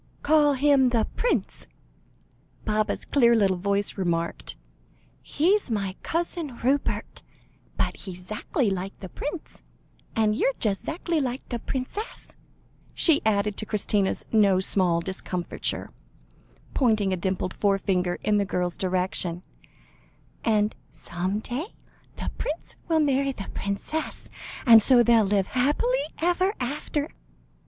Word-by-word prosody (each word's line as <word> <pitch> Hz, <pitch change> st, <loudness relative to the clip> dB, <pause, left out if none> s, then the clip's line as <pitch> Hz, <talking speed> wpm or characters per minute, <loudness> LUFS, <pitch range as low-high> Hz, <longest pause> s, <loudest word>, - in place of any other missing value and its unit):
"Call 295 Hz, -1 st, +4 dB
him 275 Hz, -1 st, +4 dB
the 230 Hz, -3 st, +2 dB
prince," -, -, -1 dB, 1.0 s
Baba's 215 Hz, 0 st, 0 dB
clear 235 Hz, -4 st, +4 dB
little 195 Hz, -4 st, +3 dB
voice 200 Hz, +1 st, -1 dB
remarked; 170 Hz, -, -2 dB, 0.7 s
"he's 370 Hz, +4 st, +1 dB
my 200 Hz, -4 st, -2 dB
Cousin 330 Hz, -5 st, -3 dB
Rupert, 275 Hz, +3 st, 0 dB, 0.6 s
but -, -, -1 dB
he's 180 Hz, -2 st, -9 dB
'zackly 215 Hz, +2 st, -1 dB
like 190 Hz, +1 st, -4 dB
the 190 Hz, -, -8 dB
prince 300 Hz, -, -6 dB, 0.5 s
and 215 Hz, -1 st, +2 dB
you're 270 Hz, +4 st, +1 dB
just 200 Hz, -3 st, -1 dB
'zackly 330 Hz, -1 st, -1 dB
like 255 Hz, -1 st, -3 dB
the 240 Hz, -, -3 dB
princess," 265 Hz, -, -5 dB, 0.6 s
she 320 Hz, -4 st, +5 dB
added, 205 Hz, -1 st, +1 dB
to 215 Hz, -, -2 dB
Christina's 205 Hz, -2 st, 0 dB
no 200 Hz, -4 st, +4 dB
small 180 Hz, -3 st, +3 dB
discomfiture, 180 Hz, -1 st, -4 dB, 0.8 s
pointing 215 Hz, -7 st, +2 dB
a -, -, +2 dB
dimpled 185 Hz, 0 st, -2 dB
forefinger 190 Hz, -3 st, +1 dB
in 210 Hz, -1 st, +3 dB
the 205 Hz, -, +2 dB
girl's 180 Hz, -2 st, -2 dB
direction, 180 Hz, -1 st, -1 dB, 1.0 s
"and 215 Hz, -1 st, +2 dB, 0.2 s
some 180 Hz, +3 st, -3 dB
day 280 Hz, -, -5 dB, 0.4 s
the -, -, -4 dB
prince 305 Hz, +3 st, -4 dB
will 320 Hz, -2 st, +3 dB
marry 275 Hz, -1 st, +2 dB
the 195 Hz, -, -7 dB
princess, 200 Hz, +11 st, -4 dB, 0.3 s
and 230 Hz, -2 st, +9 dB
so 245 Hz, +2 st, +6 dB
they'll 230 Hz, -2 st, +5 dB
live 200 Hz, -1 st, +2 dB
happy 260 Hz, +6 st, +1 dB, 0.3 s
ever 360 Hz, +4 st, +1 dB
after." 285 Hz, +3 st, -2 dB
215 Hz, 125 wpm, -26 LUFS, 190-280 Hz, 1.0 s, and